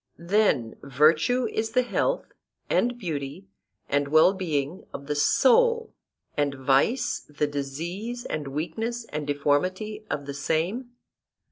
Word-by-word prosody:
Then 170 Hz, -, +1 dB
virtue 155 Hz, -, +3 dB
is 220 Hz, 0 st, -2 dB
the 250 Hz, 0 st, +4 dB
health -, -, -1 dB, 0.4 s
and 245 Hz, 0 st, +2 dB
beauty 160 Hz, -, -5 dB, 0.4 s
and 145 Hz, 0 st, +1 dB
well 155 Hz, +5 st, +5 dB
being 165 Hz, -3 st, -2 dB
of 140 Hz, -, -8 dB
the 150 Hz, -, -1 dB
soul, 465 Hz, -, +3 dB, 0.4 s
and 145 Hz, -1 st, 0 dB
vice 140 Hz, -, +2 dB
the 150 Hz, 0 st, 0 dB
disease 170 Hz, -, -4 dB
and 150 Hz, -2 st, -3 dB
weakness 220 Hz, -, -3 dB
and 150 Hz, -1 st, -4 dB
deformity 185 Hz, +10 st, 0 dB
of 145 Hz, -1 st, -3 dB
the 140 Hz, -, -5 dB
same? 180 Hz, -, -2 dB
160 Hz, 125 wpm, -26 LUFS, 145-225 Hz, 0.4 s, well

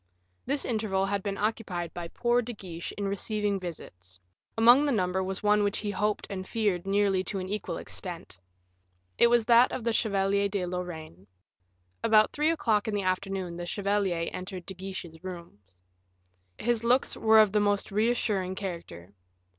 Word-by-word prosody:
This 280 Hz, +1 st, 0 dB
interval 210 Hz, -5 st, 0 dB
had 200 Hz, 0 st, -1 dB
been 195 Hz, 0 st, -3 dB
occupied 195 Hz, -6 st, -2 dB
by 175 Hz, -1 st, -5 dB
poor 240 Hz, +7 st, +1 dB
De 240 Hz, +1 st, -6 dB
Guiche 175 Hz, -5 st, -7 dB
in 200 Hz, -1 st, -3 dB
receiving 205 Hz, 0 st, -1 dB
visits; 90 Hz, -, -9 dB, 0.4 s
among 240 Hz, +5 st, +7 dB
the 290 Hz, -, +1 dB
number 190 Hz, -4 st, 0 dB
was 190 Hz, +1 st, -4 dB
one 210 Hz, 0 st, +4 dB
which 205 Hz, 0 st, 0 dB
he 205 Hz, -1 st, -3 dB
hoped 210 Hz, +1 st, -1 dB
and 185 Hz, -1 st, -6 dB
feared 205 Hz, -6 st, -1 dB
nearly 195 Hz, -1 st, +2 dB
to 195 Hz, -, -3 dB
an 185 Hz, -1 st, -4 dB
equal 210 Hz, +2 st, -3 dB
extent. 170 Hz, -, -8 dB, 0.8 s
It -, -, +7 dB
was 235 Hz, -1 st, +3 dB
that 235 Hz, +1 st, +6 dB
of 245 Hz, -, -4 dB
the 230 Hz, 0 st, 0 dB
Chevalier 200 Hz, -2 st, +1 dB
de 195 Hz, -2 st, -1 dB
Lorraine. 165 Hz, -, -6 dB, 0.8 s
About 215 Hz, -1 st, +5 dB
three 300 Hz, +2 st, +2 dB
o'clock 230 Hz, -10 st, +1 dB
in 215 Hz, -, -1 dB
the 200 Hz, -, -1 dB
afternoon 185 Hz, -1 st, -2 dB
the 175 Hz, 0 st, -5 dB
chevalier 195 Hz, -4 st, 0 dB
entered 185 Hz, -1 st, -6 dB
De 190 Hz, -, -7 dB
Guiche's 185 Hz, -3 st, -8 dB
rooms. 170 Hz, -, -10 dB, 0.8 s
His 235 Hz, 0 st, 0 dB
looks 250 Hz, +3 st, +2 dB
were 220 Hz, 0 st, +4 dB
of 215 Hz, -2 st, +6 dB
the 210 Hz, -, +2 dB
most 205 Hz, 0 st, 0 dB
reassuring 210 Hz, -3 st, 0 dB
character. 170 Hz, -, -7 dB
200 Hz, 170 wpm, -28 LUFS, 180-215 Hz, 0.8 s, among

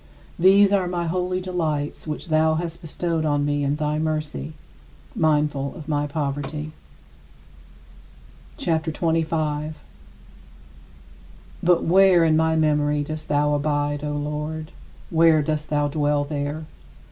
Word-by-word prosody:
These 195 Hz, +3 st, +6 dB
are 190 Hz, -3 st, +2 dB
my 175 Hz, -1 st, -2 dB
holy 180 Hz, +2 st, -1 dB
delights, 160 Hz, -6 st, -3 dB
which 155 Hz, +3 st, -5 dB
thou 155 Hz, 0 st, +3 dB
hast 170 Hz, 0 st, -4 dB
bestowed 165 Hz, 0 st, -2 dB
on 145 Hz, -2 st, +1 dB
me 145 Hz, 0 st, 0 dB
in 140 Hz, +1 st, +1 dB
thy 150 Hz, 0 st, -1 dB
mercy, 155 Hz, -, -3 dB, 0.6 s
mindful 150 Hz, -3 st, +1 dB
of 155 Hz, -4 st, -10 dB
my 145 Hz, -1 st, 0 dB
poverty. 145 Hz, +1 st, -3 dB, 1.9 s
CHAPTER 160 Hz, -1 st, -1 dB
XXV 165 Hz, 0 st, 0 dB, 0.4 s
36. 155 Hz, 0 st, -9 dB, 1.8 s
But 175 Hz, 0 st, +3 dB
where 185 Hz, 0 st, +5 dB
in 160 Hz, -1 st, +3 dB
my 160 Hz, 0 st, +2 dB
memory 150 Hz, -1 st, +2 dB
dost 155 Hz, +1 st, -6 dB
thou 150 Hz, 0 st, +2 dB
abide, 145 Hz, 0 st, -1 dB
O 150 Hz, 0 st, -2 dB
Lord? 150 Hz, +2 st, -4 dB, 0.4 s
Where 165 Hz, -2 st, +5 dB
dost 150 Hz, 0 st, -2 dB
thou 145 Hz, -1 st, +1 dB
dwell 145 Hz, 0 st, +1 dB
there? 145 Hz, +1 st, -4 dB
155 Hz, 125 wpm, -23 LUFS, 145-165 Hz, 1.9 s, These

